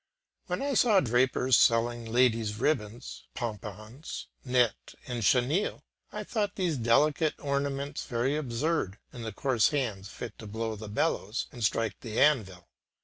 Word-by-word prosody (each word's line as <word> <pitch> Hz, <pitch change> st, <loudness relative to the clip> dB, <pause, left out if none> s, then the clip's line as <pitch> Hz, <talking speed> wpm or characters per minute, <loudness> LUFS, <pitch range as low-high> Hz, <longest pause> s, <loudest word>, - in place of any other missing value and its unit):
When -, -, -2 dB
I 280 Hz, 0 st, 0 dB
saw 220 Hz, -6 st, +5 dB
drapers 125 Hz, -1 st, +3 dB
selling 115 Hz, 0 st, +3 dB
ladies 115 Hz, -3 st, +2 dB
ribbons, 120 Hz, -3 st, -2 dB
pompons, 110 Hz, -, -6 dB, 0.2 s
net, 125 Hz, -4 st, +1 dB
and 120 Hz, -2 st, -4 dB
chenille, 135 Hz, -, +2 dB, 0.3 s
I -, -, -5 dB
thought 205 Hz, -3 st, -2 dB
these 180 Hz, -5 st, 0 dB
delicate 145 Hz, +7 st, +3 dB
ornaments 140 Hz, 0 st, -2 dB
very 125 Hz, +4 st, 0 dB
absurd 135 Hz, -, -1 dB, 0.2 s
in 120 Hz, -, -8 dB
the 110 Hz, -1 st, -4 dB
coarse 120 Hz, +1 st, +2 dB
hands 110 Hz, -9 st, -2 dB
fit 115 Hz, -1 st, -8 dB
to 110 Hz, -, -8 dB
blow 110 Hz, +1 st, -3 dB
the 105 Hz, 0 st, -8 dB
bellows 105 Hz, +1 st, -1 dB
and 120 Hz, -, -7 dB
strike 110 Hz, +1 st, 0 dB
the 110 Hz, -2 st, -4 dB
anvil. 100 Hz, -12 st, +2 dB
120 Hz, 145 wpm, -29 LUFS, 110-140 Hz, 0.3 s, saw